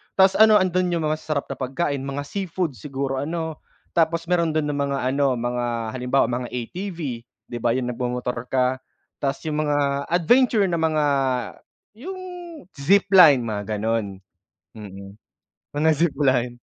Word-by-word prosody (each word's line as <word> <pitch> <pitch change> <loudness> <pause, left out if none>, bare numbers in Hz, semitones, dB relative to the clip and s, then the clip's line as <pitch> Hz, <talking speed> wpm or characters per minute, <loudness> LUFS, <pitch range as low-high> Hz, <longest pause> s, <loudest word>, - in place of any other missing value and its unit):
Tas 190 0 +5
ano 220 -1 +7
andun 185 -2 +2
'yung 170 -2 -1
mga 155 0 0
masasarap 150 -3 -2
na 135 - -6
pagkain, 140 +2 -2
mga 140 +1 -4
seafood 180 0 -3
siguro 135 +4 -3
ano. 160 +2 -4 0.4
Tapos 165 0 +2
meron 170 -3 +1
dun 155 -1 +1
ng 145 - -2
mga 140 0 -2
ano 140 -2 +1
mga, 120 +1 -2 0.3
halimbawa 125 +2 +2
mga 125 0 -2
ATV, 175 - -6 0.5
'di 120 - -3
ba 115 0 +1
'yung 125 -1 -1
nagmomotor 125 0 -3
ka. 130 0 +1 0.4
Tas 135 -1 -2
'yung 155 -2 -2
mga 140 -1 0
adventure 215 +6 +3
na 170 - 0
mga, 155 -2 +1 1.0
'yung 375 +6 -7 0.5
zipline 175 -3 +5
mga 105 -1 -3
ganun, 105 -2 -2 0.6
mm. 100 -2 -10 0.6
Mga 155 +2 +3
zipline. 135 -6 +1
140 Hz, 145 wpm, -23 LUFS, 125-170 Hz, 1.0 s, ano